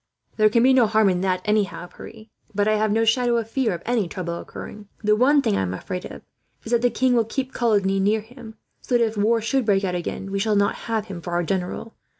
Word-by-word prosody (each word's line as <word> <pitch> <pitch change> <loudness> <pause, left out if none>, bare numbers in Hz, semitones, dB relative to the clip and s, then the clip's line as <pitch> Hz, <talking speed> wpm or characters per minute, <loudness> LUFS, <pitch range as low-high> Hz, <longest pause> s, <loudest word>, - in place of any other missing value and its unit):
"There 215 -1 +5
can 230 +2 +3
be 260 +1 +5
no 250 -4 +5
harm 215 -1 +3
in 180 -1 0
that 185 -1 -1
anyhow, 210 -4 0
Pierre, 215 +5 -12 0.3
but 205 +1 +1
I 215 - +3
have 215 0 +1
no 225 +2 +2
shadow 240 +1 +2
of 225 -1 -4
fear 260 -4 +1
of - - -10
any 235 -5 0
trouble 170 -1 -5
occurring. 210 -1 -10 0.2
The 210 0 +4
one 275 +5 +4
thing - - +1
I 95 - 0
am 95 -1 -2
afraid 180 - -6
of - - -10 0.4
is 225 - -8
that 235 -1 +3
the 245 - +3
king 255 +1 +1
will 235 -2 +3
keep 260 +4 -4
Coligny 200 -5 +1
near 210 +3 +2
him, 225 0 -13 0.3
so 245 - +1
that 235 - +3
if 220 0 -4
war 220 +3 +2
should 245 +4 0
break 200 -1 +3
out 185 -2 -1
again, 180 +2 -4
we 200 - -1
shall 210 +1 +1
not 200 0 +2 0.2
have 220 -2 -1
him 190 -5 -8
for 175 +1 -6
our 175 0 +1
general. 185 +5 -3
215 Hz, 255 wpm, -23 LUFS, 195-235 Hz, 0.4 s, There